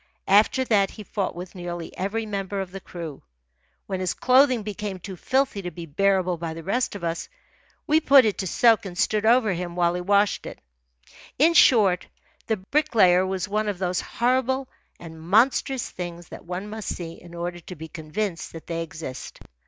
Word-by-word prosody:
After 215 +6 +4
that 200 -5 +3
he 215 - -10
fought 200 -3 -3
with 180 +1 -8
nearly 175 -2 -6
every 210 +4 -2
member 200 -1 -3
of 190 -2 -4
the 195 - -7
crew. 165 -6 -8 0.6
When 190 -1 -3
his 185 -1 -1
clothing 255 -2 +4
became 205 -1 -5
too 190 +1 -8
filthy 260 +1 0
to 180 - -4
be 170 0 -8
bearable 185 +2 +1
by 165 -1 -5
the 165 - -8
rest 225 +5 -1
of 195 - -8
us, 165 0 -3 0.6
we 315 -1 +4
put 275 -4 +6
it 210 - 0
to 190 - -2
soak 225 +2 +3
and 175 -2 -9
stood 215 0 +1
over 230 -4 +4
him 175 0 -5
while 175 -1 +2
he 180 - -3
washed 200 +2 +2
it. - - -9 0.8
In 320 +5 +5
short, 210 - +5 0.4
the 220 - +1
Bricklayer 190 -6 +3
was 190 -1 -2
one 210 +1 -1
of 200 - -3
those 180 -1 -1
horrible 260 +2 0 0.3
and 160 -2 -10
monstrous 240 - +2
things 175 -1 -7
that - - -10
one 180 +3 -5
must 215 -1 -7
see 165 -2 -8
in 175 -1 -12
order 175 0 -4
to 180 +2 -10
be 160 0 -8
convinced 165 +4 -4
that 165 - -9
they 165 -1 -3
exist. 160 -6 -7
190 Hz, 190 wpm, -24 LUFS, 175-220 Hz, 0.8 s, put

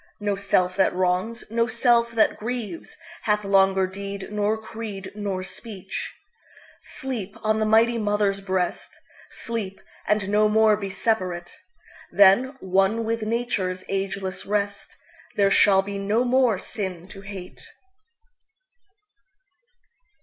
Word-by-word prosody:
No 205 -1 0
Self 185 -2 +1
that 190 - +3
wrongs, 185 +6 0
no 230 0 +2
Self 235 -2 +2
that 220 -1 +2
grievesHath 225 -2 -4
longer 195 -1 +3
deed 195 +1 -6
nor 210 +1 0
creed 215 -3 -7
nor 200 -3 -3
speech. 195 -1 -6 0.7
Sleep 230 -7 -5
on 215 0 +2
the 215 - +1
mighty 230 +2 +4
Mother's 205 -2 +1
breast! 185 -2 -2 0.3
Sleep, 215 -5 -5 0.3
and 210 -2 +1
no 210 +1 +3
more 220 0 +5
be 200 -2 -5
separate! 185 -4 -1 0.6
Then, 205 +8 +5
one 195 +4 +1
with 230 0 -1
Nature's 215 -5 -2
ageless 195 -1 -3
rest, 200 0 -3 0.4
There 200 -1 +3
shall 195 -2 +5
be 200 0 -5
no 210 +5 +1
more 250 -4 +3
sin 185 -3 -5
to 195 - -11
hate. 195 -2 -9
205 Hz, 120 wpm, -24 LUFS, 190-220 Hz, 0.7 s, more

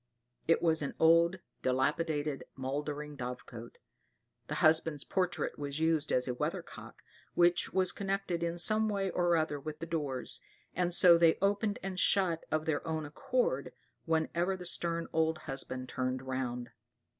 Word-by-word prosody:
It 165 - +3
was 160 -2 +2
an 140 - -4
old, 170 +2 +5 0.2
dilapidated, 145 +3 0
mouldering 145 +2 -4
dovecot. 125 -2 -7 0.7
The - - -3
husband's 155 -2 +3
portrait 180 -5 -1
was 145 0 -3
used 160 -2 +1
as 125 0 +1
a 125 - -1
weather 160 +8 -2
cock, - - -12 0.3
which 175 0 +3
was 185 -1 +2
connected 195 -3 -2
in 170 0 -1
some 215 +4 +3
way 195 -2 -1
or 175 -1 +2
other 155 -2 -1
with 150 +2 -6
the 165 - -5
doors, 145 -6 -3 0.3
and 180 0 0
so 175 -1 +7
they 165 -1 +5
opened 205 +2 +1
and 190 -1 -4
shut 180 -5 +2
of 155 0 0
their 155 -3 0
own 160 -1 -2
accord, 240 - -1 0.3
whenever 170 +3 0
the 180 - -9
stern 170 -1 -2
old 160 0 +2
husband 130 -2 -3
turned 130 0 -2
round. 125 -2 -3
160 Hz, 155 wpm, -32 LUFS, 145-175 Hz, 0.7 s, so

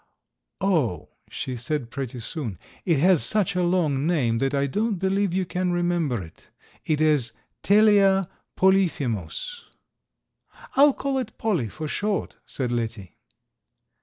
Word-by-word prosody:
"Oh!" 155 - 0 0.2
she 130 - -4
said 125 0 -3
pretty 130 -3 -5
soon, 115 - -5 0.3
"it 170 -4 +3
has 175 +2 +4
such 210 -5 +1
a 180 - +1
long 165 -6 +1
name 125 -10 +1
that 135 +1 +1
I 140 0 +1
don't 210 - 0
believe 190 +1 0
you 185 +1 0
can 180 +1 -1
remember 175 - 0
it. 80 - -16 0.3
It 155 -2 0
is 150 -7 +3 0.3
Telea 200 -2 +4 0.3
polyphemus." 185 - 0 1.1
"I'll 285 +1 +6
call 270 0 -2
it 235 -4 -6
Polly 180 - 0
for 155 +8 -6
short," 205 +6 -2
said 125 -3 -3
Letty. 115 -5 -4
165 Hz, 135 wpm, -24 LUFS, 130-195 Hz, 1.1 s, I'll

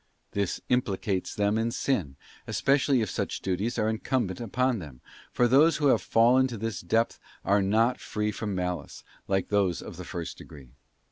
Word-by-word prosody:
* - - -46
This 100 -3 -1
implicates 100 -6 -1
them 105 +1 +1
in 115 +1 0
sin, 95 - -1 0.3
especially 135 -2 +2
if 110 - -1
such - - -3
duties 100 +6 -2
are 105 - +1
incumbent 110 -3 -1
upon 125 +1 0
them, 70 -7 -10 0.3
for 120 - +3
those 145 +7 +5
who 145 -2 +3
have - - +4
fallen 125 +3 +4
to 120 -3 -6
this 105 -3 -3
depth 115 +7 0 0.3
are 100 +1 +3
not 110 +5 +2
free 105 0 -2
from 105 -1 -4
malice, 90 -4 -4 0.2
like 95 -1 0
those 100 -4 +1
of - - -9
the - - -6
first 85 -2 -6
degree. 65 -5 -13
105 Hz, 180 wpm, -27 LUFS, 95-120 Hz, 0.3 s, those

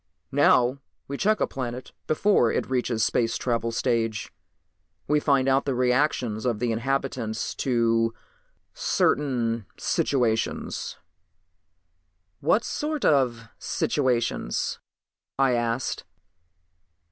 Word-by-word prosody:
Now 125 +2 +4 0.3
we 140 - -4
check 215 +8 +2
a - - +3
planet 125 -1 -5 0.2
before 155 - +3
it - - -1
reaches 125 -3 0
the - - +4
space 115 -2 +1
travel 115 -2 -1
stage. 115 -3 -1 0.7
We 150 +1 +3
find 135 -3 +2
out 135 +1 +3
the 135 -3 0
reactions 125 -3 +1
of 120 -4 0
the 120 +1 -1
inhabitants 120 -2 -2
to 115 -3 +2 0.6
certain 120 -6 0
situations." 115 -5 -1 1.4
"What 190 +10 +2
sort 300 -1 -2
of 125 -6 +2
situations?" 120 - -1 0.6
I 135 -1 +3
asked. 120 +1 -1
125 Hz, 100 wpm, -25 LUFS, 115-135 Hz, 1.4 s, Now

